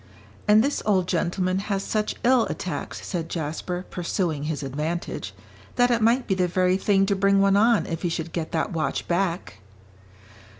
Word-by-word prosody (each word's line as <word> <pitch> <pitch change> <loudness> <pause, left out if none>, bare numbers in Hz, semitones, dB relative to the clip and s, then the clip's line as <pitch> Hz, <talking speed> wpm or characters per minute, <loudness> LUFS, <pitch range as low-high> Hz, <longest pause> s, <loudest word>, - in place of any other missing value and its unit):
"And 210 +1 +6
this 285 +2 -1
old 190 -4 +2
gentleman 185 +1 0
has 195 -1 -2
such 215 -1 -1
ill 250 -1 +4
attacks," 170 -6 -5
said 165 -3 -3
Jasper, 170 +3 -4
pursuing 170 -4 -2
his 150 -1 -3
advantage, 150 +6 -4 0.4
"that 245 0 +3
it 235 -1 +2
might 235 +4 +3
be 195 - 0
the 185 -1 +1
very 180 +1 +2
thing 195 -1 +2
to 200 0 +1
bring 195 +1 +3
one 195 0 +4
on 225 +2 +4
if 165 -1 -4
he 175 - 0
should 165 0 -4
get 165 -2 -3
that 165 +4 -1
watch 160 -2 -2
back." 175 - -1
185 Hz, 175 wpm, -24 LUFS, 170-200 Hz, 0.4 s, And